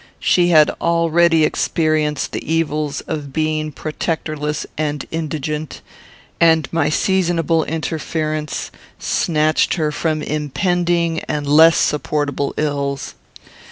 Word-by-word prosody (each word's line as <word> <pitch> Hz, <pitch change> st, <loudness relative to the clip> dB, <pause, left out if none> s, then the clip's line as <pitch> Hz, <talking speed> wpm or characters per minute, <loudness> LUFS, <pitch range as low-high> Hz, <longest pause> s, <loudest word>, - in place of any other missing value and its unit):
She 175 Hz, -1 st, +3 dB
had 155 Hz, -3 st, +5 dB
already 170 Hz, -1 st, +3 dB
experienced 155 Hz, -2 st, 0 dB
the -, -, -5 dB
evils 155 Hz, -3 st, -1 dB
of 150 Hz, -3 st, -5 dB
being 155 Hz, 0 st, -1 dB
protectorless 155 Hz, -1 st, -3 dB
and 150 Hz, -2 st, -2 dB
indigent, 155 Hz, -1 st, -4 dB, 0.6 s
and 160 Hz, -3 st, +4 dB
my 165 Hz, -, +2 dB
seasonable 165 Hz, -2 st, +1 dB
interference 155 Hz, -1 st, -3 dB, 0.3 s
snatched 155 Hz, -1 st, +1 dB
her 155 Hz, -4 st, 0 dB
from 155 Hz, 0 st, -1 dB
impending 170 Hz, +2 st, 0 dB
and 150 Hz, -1 st, -2 dB
less 160 Hz, +3 st, +6 dB
supportable 145 Hz, -1 st, -1 dB
ills. 140 Hz, -2 st, -2 dB
155 Hz, 100 wpm, -19 LUFS, 150-165 Hz, 0.6 s, less